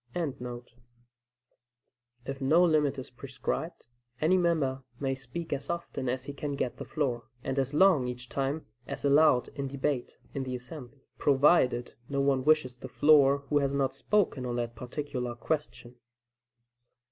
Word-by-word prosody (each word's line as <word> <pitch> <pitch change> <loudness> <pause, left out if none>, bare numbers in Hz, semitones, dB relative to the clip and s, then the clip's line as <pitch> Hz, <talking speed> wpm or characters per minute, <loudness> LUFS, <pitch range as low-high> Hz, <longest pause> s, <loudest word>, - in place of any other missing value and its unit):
] 120 - -28 2.1
If 135 0 -5
no 160 +7 +5
limit 150 -4 +2
is 130 - -7
prescribed, 135 +6 -5 0.3
any 165 +4 +3
member 160 -7 +1 0.2
may 135 -1 0
speak 135 +6 -5
as 140 0 -4
often 170 -6 -3
as 130 +1 -2
he 140 +1 -6
can 145 0 -4
get 125 - -2
the - - -6
floor, 130 -7 -2 0.2
and 135 - -1
as 135 0 0
long 165 -7 +5
each 125 0 -6
time 140 +4 -2 0.2
as - - -5
allowed 145 -2 +5
in 140 -1 -4
debate 135 -1 -2 0.2
in 135 - -2
the 130 -1 -3
assembly, 130 +1 -10
provided 135 -3 +3 0.2
no 140 -1 -1
one 140 -1 +2
wishes 150 -4 +3
the 130 - -9
floor 140 0 +5
who 145 - +3
has 140 0 0
not 135 -2 +1
spoken 170 -2 +1
on 120 -1 -2
that 120 -1 -2
particular 125 -2 -4
question. 125 -1 -4
140 Hz, 155 wpm, -29 LUFS, 130-150 Hz, 2.1 s, no